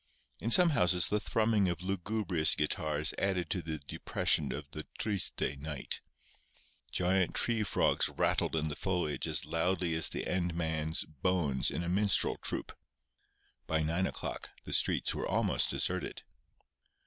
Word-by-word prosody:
In 115 - -3
some 175 +7 +8
houses 90 - +2
the 105 - +1
thrumming 110 -3 +1
of 85 0 -4
lugubrious 95 -3 +1
guitars 75 0 +1
added 90 -4 -1
to 90 - -1
the 80 -1 -5
depression 70 - -1
of 70 0 -6
the 75 - -6
triste 100 -4 -1 0.2
night. 75 -2 -4 0.9
Giant 90 0 0
tree 115 -2 +1
frogs 105 - +1
rattled - - 0
in 80 -1 -1
the 75 - -3
foliage 90 -5 -2
as 75 -2 +3
loudly 85 +2 -1
as 80 -1 +2
the - - -4
end 90 -2 -1
man's 80 -1 -1
"bones" 75 -2 -1
in 85 - -3
a - - -4
minstrel 100 +3 +2
troupe. - - -3 0.9
By 80 0 0
nine 85 +4 0
o'clock - - -6
the - - -4
streets - - +2
were - - -3
almost - - +1
deserted. - - 0
85 Hz, 150 wpm, -31 LUFS, 80-95 Hz, 0.9 s, some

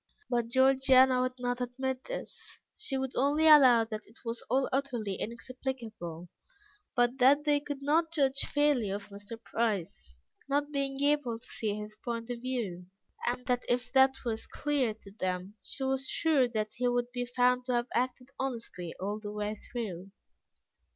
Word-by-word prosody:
But 240 -1 +1
Georgiana 260 0 +5
would 255 0 -1
not 245 0 -2
admit 260 +1 -3
this; - - -7 0.2
she 270 - -2
would 265 -1 -3
only 290 +4 +3
allow 260 -7 +8
that 215 -1 -6
it 225 +3 -20
was 230 +1 -3
all 265 +1 +2
utterly 250 -7 -1
inexplicable, 230 -7 -5 0.7
but 245 +1 +2
that 280 +4 +6
they 295 -1 +3
could 285 -1 -6
not 320 +3 +2
judge 275 -4 +2
fairly 290 -8 +2
of 200 +1 -4
Mr. 205 +3 -8
Price, 175 - -2 0.3
not 290 +1 +1
being 275 -1 -1
able 285 -5 +2
to 225 - -16
see 210 -2 -2
his 210 0 -7
point 235 0 -3
of 235 -1 -5
view, 215 -9 -3 0.4
and 250 +1 -1
that 250 -2 +1
if 245 +1 0
that 265 0 +6
was 225 -2 -2
clear 275 -7 0
to 200 -2 -15
them, 185 -1 -3
she 270 - -6
was 265 0 0
sure 300 -6 +3
that 215 -3 -2
he 250 +1 0
would 245 0 0
be 245 -1 -3
found 250 +1 +2
to 250 - +1
have 240 0 +1
acted 250 +1 -1
honestly 230 -10 -4
all 205 +3 -2
the 205 -1 -6
way 210 0 -3
through. 195 -6 -4
245 Hz, 170 wpm, -31 LUFS, 220-265 Hz, 0.7 s, allow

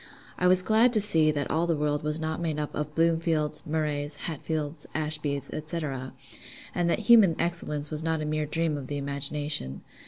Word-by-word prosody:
I 180 - +2
was 185 0 +6
glad 225 +4 +3
to 215 - +4
see 165 -7 +4
that 145 -3 -2
all 165 +2 0
the 165 - +1
world 150 0 -1
was 150 0 0
not 160 +1 -3
made 160 -3 -2
up 150 - -4
of 150 0 -5
Bloomfields, 160 -2 +1
Murrays, 150 -1 -1
Hatfields, 155 -1 -4
Ashbys, 150 -3 -2 0.2
&c. 135 -5 -5 0.3
and 175 -1 0
that - - +1
human 210 -6 +5
excellence 155 -3 -1
was 155 0 -2
not 160 -1 -1
a 155 - -3
mere 155 0 -2
dream 160 0 -1
of 130 - -9
the 145 - -4
imagination. 140 - 0
155 Hz, 185 wpm, -27 LUFS, 145-165 Hz, 0.3 s, was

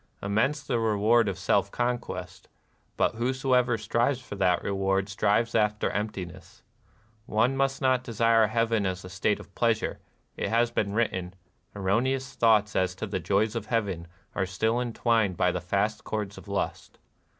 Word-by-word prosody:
Immense 110 +9 0
the 120 -5 -1
reward 110 0 +3
of 95 - -4
self 100 +1 +1
conquest; 120 +2 -4 0.5
but - - +2
whosoever 125 -1 +1
strives 115 +4 0
for 130 - -10
that 95 -3 +1
reward 95 0 0
strives 105 +3 +1
after 105 -1 +1
emptiness. 100 -5 -6 0.6
One 120 +5 +2
must 135 0 0
not 130 -1 +3
desire 115 -2 +3
heaven 115 -2 +1
as 95 0 -4
a - - -8
state 100 +3 0
of 95 - -13
pleas 115 -2 +2
ure; - - -3 0.4
it - - -2
has 120 +1 +2
been 100 -4 -1
written, 95 -5 -1 0.4
Erroneous 125 +7 0
thoughts 110 -2 +3
as 95 -1 +1
to 95 - -4
the 100 - -3
joys 105 +3 +1
of 110 -2 -4
heaven 100 -8 -1 0.3
are 95 -2 -1
still 110 +6 0
entwined 115 -5 +1
hy 90 - +3
the 90 - -3
fast 100 +4 -1
cords 105 -2 -4
of - - -12
lust. 100 0 -3
110 Hz, 160 wpm, -27 LUFS, 100-120 Hz, 0.6 s, reward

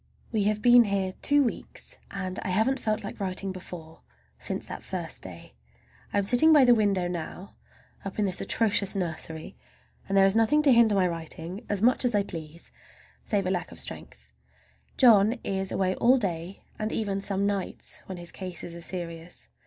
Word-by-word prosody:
We 215 -3 +1
have 210 0 0
been 245 -1 +7
here 195 -2 -1
two 290 0 +4
weeks, 385 - -5
and 185 -2 -4
I - - -5
haven't 220 +9 +1
felt 215 -2 -1
like 200 - -7
writing 190 0 -1
before, 175 -3 -10 0.4
since - - -3
that - - -7
first - - -5
day. - - -10 0.6
I - - -1
am 200 - +2
sitting 245 +10 +5
by 295 -4 +7
the 245 - +7
window 200 -5 +1
now, 175 +2 -6 0.5
up 195 - -7
in 210 - +1
this 185 -1 +2
atrocious 205 -3 +1
nursery, 160 -3 -4 0.5
and 195 - +1
there 195 - +7
is 195 +1 +2
nothing 225 +7 +3
to 280 -3 +6
hinder 230 -3 +5
my 185 -2 +3
writing 170 +4 -6
as 205 0 0
much 250 +3 +4
as 245 -3 +1
I 205 - +3
please, 165 -3 -9 0.5
save 200 -3 -1
lack 185 -1 -2
of - - -9
strength. - - -7 0.7
John 220 -4 +6
is 190 -1 -2
away 185 -1 0
all 250 +6 +4
day, 180 -4 -4 0.2
and 215 +1 -2
even 200 -3 -2
some 200 0 0
nights 200 -2 -4
when 185 - -6
his 175 0 -6
cases 180 -2 -6
are 170 - -8
serious. 170 -1 -6
195 Hz, 185 wpm, -27 LUFS, 180-220 Hz, 0.7 s, been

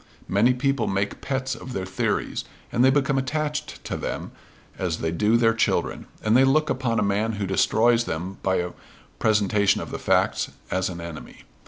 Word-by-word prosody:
Many 115 +6 +3
people 135 -2 0
make 100 +1 -1
pets 135 -1 -2
of 130 - -8
their 95 -4 -3
theories; 95 0 -1 0.3
and 120 - +2
they 130 - +7
become 140 0 +2
attached 150 +2 -3
to - - -3
them - - -4 0.5
as 90 -4 -1
they 80 - -2
do 105 +7 +3
their 115 -1 +4
children; 115 - 0 0.2
and 110 +1 +3
they 130 - +7
look 145 +3 +3
upon 125 -3 0
a - - +2
man 105 +3 0
who 100 -1 -2
destroys 115 +5 +3
them 90 +4 -4
by 95 -1 +1
a 90 0 -1 0.5
presentation 105 -2 +3
of - - -6
the - - -4
facts - - +1 0.2
as 95 0 0
an 85 -2 -6
enemy. 85 -2 -9
110 Hz, 185 wpm, -24 LUFS, 95-130 Hz, 0.5 s, they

